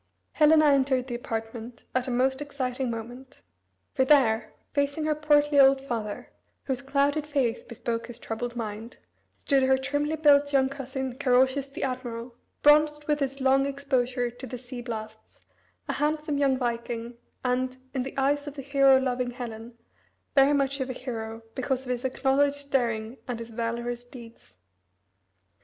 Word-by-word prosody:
Helena 310 Hz, 0 st, +5 dB
entered 270 Hz, -3 st, +3 dB
the 255 Hz, -, -6 dB
apartment 230 Hz, 0 st, -5 dB
at 255 Hz, 0 st, 0 dB
a -, -, -2 dB
most 265 Hz, +2 st, +1 dB
exciting 265 Hz, -3 st, -3 dB
moment. 240 Hz, -, -8 dB, 0.5 s
For 260 Hz, -, +3 dB
there, 260 Hz, -6 st, +3 dB, 0.2 s
facing 285 Hz, +2 st, 0 dB
her 310 Hz, -, +2 dB
portly 295 Hz, -1 st, +3 dB
old 270 Hz, 0 st, +7 dB
father, 230 Hz, -6 st, -5 dB, 0.3 s
whose 265 Hz, -1 st, -2 dB
clouded 280 Hz, +2 st, +1 dB
face 270 Hz, -6 st, 0 dB
bespoke 235 Hz, 0 st, -4 dB
his 240 Hz, -, -8 dB
troubled 235 Hz, +2 st, -5 dB
mind, 225 Hz, 0 st, -6 dB, 0.3 s
stood 275 Hz, -2 st, +1 dB
her 265 Hz, 0 st, +4 dB
trimly 290 Hz, +3 st, -1 dB
built 290 Hz, -2 st, +4 dB
young 265 Hz, -2 st, +3 dB
cousin 265 Hz, -1 st, -5 dB
Carausius 260 Hz, +1 st, +3 dB
the 275 Hz, -, -6 dB
admiral, 250 Hz, -2 st, -4 dB, 0.3 s
bronzed 295 Hz, 0 st, +5 dB
with 300 Hz, -1 st, +1 dB
his 275 Hz, -1 st, -2 dB
long 270 Hz, +1 st, +3 dB
exposure 260 Hz, -3 st, -1 dB
to 250 Hz, +2 st, -9 dB
the 250 Hz, -, -6 dB
sea 245 Hz, 0 st, -8 dB
blasts, 220 Hz, -2 st, -8 dB, 0.5 s
a -, -, -1 dB
handsome 300 Hz, -1 st, -1 dB
young 270 Hz, -2 st, +3 dB
viking, 235 Hz, -1 st, -3 dB, 0.3 s
and, 255 Hz, +1 st, 0 dB, 0.2 s
in 265 Hz, -, -1 dB
the 265 Hz, +2 st, -6 dB
eyes 285 Hz, +2 st, +1 dB
of 290 Hz, -, -6 dB
the 275 Hz, -, -6 dB
hero 275 Hz, -1 st, +5 dB
loving 250 Hz, -1 st, -1 dB
Helen, 235 Hz, -1 st, -8 dB, 0.6 s
very 275 Hz, +1 st, +5 dB
much 275 Hz, 0 st, +1 dB
of 265 Hz, 0 st, -2 dB
a -, -, -2 dB
hero 225 Hz, -3 st, -6 dB
because 260 Hz, 0 st, -2 dB
of 250 Hz, -, -3 dB
his 245 Hz, -1 st, -2 dB
acknowledged 280 Hz, +2 st, +1 dB
daring 230 Hz, -2 st, 0 dB
and 245 Hz, -2 st, -3 dB
his 230 Hz, 0 st, -8 dB
valorous 235 Hz, +1 st, -3 dB
deeds. 240 Hz, -2 st, -14 dB
260 Hz, 160 wpm, -27 LUFS, 240-280 Hz, 0.6 s, old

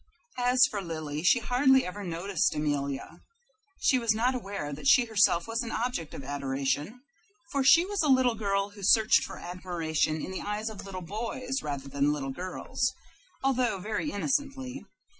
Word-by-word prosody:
As 250 Hz, +1 st, +5 dB
for 205 Hz, -, -3 dB
Lily, 155 Hz, -4 st, -4 dB
she 185 Hz, +8 st, +5 dB
hardly 260 Hz, +3 st, +3 dB
ever 200 Hz, +3 st, -6 dB
noticed 175 Hz, 0 st, -1 dB
Amelia. 140 Hz, -2 st, -3 dB, 0.6 s
She 260 Hz, -, +3 dB
was 230 Hz, -3 st, +1 dB
not 245 Hz, +4 st, +2 dB
aware 200 Hz, -, -4 dB
that 145 Hz, -, -5 dB
she 260 Hz, -2 st, +6 dB
herself 205 Hz, -5 st, +3 dB
was 225 Hz, +1 st, -1 dB
an 235 Hz, -, -4 dB
object 230 Hz, -10 st, -3 dB
of -, -, -7 dB
adoration; 140 Hz, -, -2 dB, 0.5 s
for 280 Hz, -1 st, +1 dB
she 330 Hz, +6 st, +7 dB
was 405 Hz, +1 st, -1 dB
a 310 Hz, -, +1 dB
little 260 Hz, -2 st, +4 dB
girl 200 Hz, -2 st, -1 dB
who 205 Hz, 0 st, -13 dB
searched 220 Hz, +3 st, +5 dB
for -, -, -8 dB
admiration 170 Hz, -3 st, -2 dB
in 185 Hz, -, -5 dB
the 190 Hz, -, -4 dB
eyes 210 Hz, +2 st, -3 dB
of 205 Hz, -2 st, -9 dB
little 185 Hz, -2 st, -6 dB
boys 240 Hz, +7 st, -4 dB
rather 140 Hz, -2 st, -5 dB
than 140 Hz, +1 st, +1 dB
little 140 Hz, -2 st, -3 dB
girls, 185 Hz, -, -2 dB, 0.5 s
although 255 Hz, -5 st, +1 dB
very 215 Hz, +9 st, -2 dB
innocently. 275 Hz, +2 st, -2 dB
205 Hz, 170 wpm, -28 LUFS, 160-250 Hz, 0.6 s, she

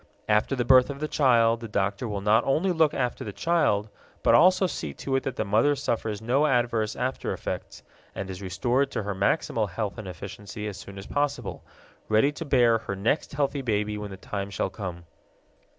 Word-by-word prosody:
After 105 Hz, +5 st, +2 dB
the 120 Hz, -2 st, -1 dB
birth 130 Hz, +1 st, +6 dB
of 140 Hz, -1 st, -5 dB
the 155 Hz, -, -2 dB
child 115 Hz, -6 st, +3 dB
the 115 Hz, -, -7 dB
doctor 100 Hz, +2 st, -1 dB
will 105 Hz, -2 st, -3 dB
not 105 Hz, +3 st, +4 dB
only 165 Hz, +8 st, +1 dB
look 160 Hz, -3 st, +3 dB
after 125 Hz, -2 st, -1 dB
the 105 Hz, -, -5 dB
child 110 Hz, -, +1 dB, 0.4 s
but -, -, +5 dB
also 185 Hz, +3 st, +6 dB
see 75 Hz, -, -4 dB
to 135 Hz, -, -2 dB
it 135 Hz, -, +2 dB
that 135 Hz, -, -4 dB
the 110 Hz, -, -1 dB
mother 110 Hz, +8 st, +3 dB
suffers 110 Hz, -6 st, -2 dB
no 135 Hz, +6 st, +2 dB
adverse 120 Hz, -5 st, +1 dB
after 130 Hz, +1 st, -2 dB
effects -, -, -6 dB, 0.3 s
and 95 Hz, -, -4 dB
is 95 Hz, 0 st, -7 dB
restored 120 Hz, +9 st, 0 dB
to 110 Hz, -, -3 dB
her 100 Hz, 0 st, -2 dB
maximal 105 Hz, +1 st, 0 dB
health 100 Hz, +4 st, -4 dB
and 105 Hz, -, -7 dB
efficiency 100 Hz, +4 st, -7 dB
as 100 Hz, -, -6 dB
soon 100 Hz, 0 st, -10 dB
as 95 Hz, -, -8 dB
possible, 145 Hz, +2 st, -2 dB, 0.5 s
ready 110 Hz, +7 st, +4 dB
to 165 Hz, +3 st, -7 dB
bear 120 Hz, -5 st, +4 dB
her 100 Hz, -, -5 dB
next 110 Hz, +12 st, -1 dB
healthy 140 Hz, -1 st, 0 dB
baby 105 Hz, -3 st, -1 dB
when 105 Hz, 0 st, -5 dB
the 95 Hz, -, -8 dB
time 100 Hz, +1 st, -5 dB
shall 100 Hz, -1 st, -2 dB
come. 90 Hz, -4 st, -6 dB
115 Hz, 200 wpm, -26 LUFS, 100-135 Hz, 0.5 s, birth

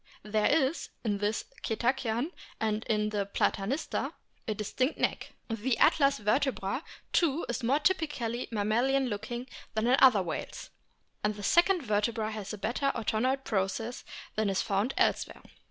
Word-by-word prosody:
There 210 Hz, 0 st, +1 dB
is 290 Hz, +1 st, +1 dB
in 205 Hz, -3 st, 0 dB
this 210 Hz, +1 st, -1 dB, 0.2 s
Cetacean 245 Hz, +4 st, 0 dB, 0.3 s
(and 220 Hz, 0 st, 0 dB
in 210 Hz, -1 st, +1 dB
Platanista) 200 Hz, +5 st, -1 dB, 0.3 s
a 215 Hz, -, -1 dB
distinct 255 Hz, +7 st, -1 dB
neck. -, -, -1 dB
The 230 Hz, +2 st, -1 dB
atlas 275 Hz, -2 st, +4 dB
vertebra 215 Hz, +2 st, 0 dB, 0.3 s
too 325 Hz, -2 st, +2 dB
is 240 Hz, +1 st, -2 dB
more 250 Hz, +4 st, +3 dB
typically 295 Hz, -9 st, 0 dB
mammalian 240 Hz, +5 st, +1 dB
looking 235 Hz, +4 st, -4 dB, 0.3 s
than 220 Hz, +1 st, +1 dB
in 250 Hz, +2 st, +5 dB
other 220 Hz, -8 st, +7 dB
whales, 165 Hz, -3 st, -5 dB, 0.5 s
and 210 Hz, 0 st, +1 dB
the 205 Hz, -, -8 dB
second 345 Hz, -, +4 dB
vertebra 215 Hz, 0 st, 0 dB
has 215 Hz, -3 st, -5 dB
a 210 Hz, -, -5 dB
better 245 Hz, +7 st, 0 dB
odontoid 250 Hz, +4 st, 0 dB
process 220 Hz, +3 st, -2 dB, 0.3 s
than 215 Hz, -1 st, +1 dB
is 195 Hz, -, +1 dB
found 205 Hz, +4 st, 0 dB
elsewhere. -, -, +1 dB
225 Hz, 140 wpm, -30 LUFS, 210-265 Hz, 0.5 s, other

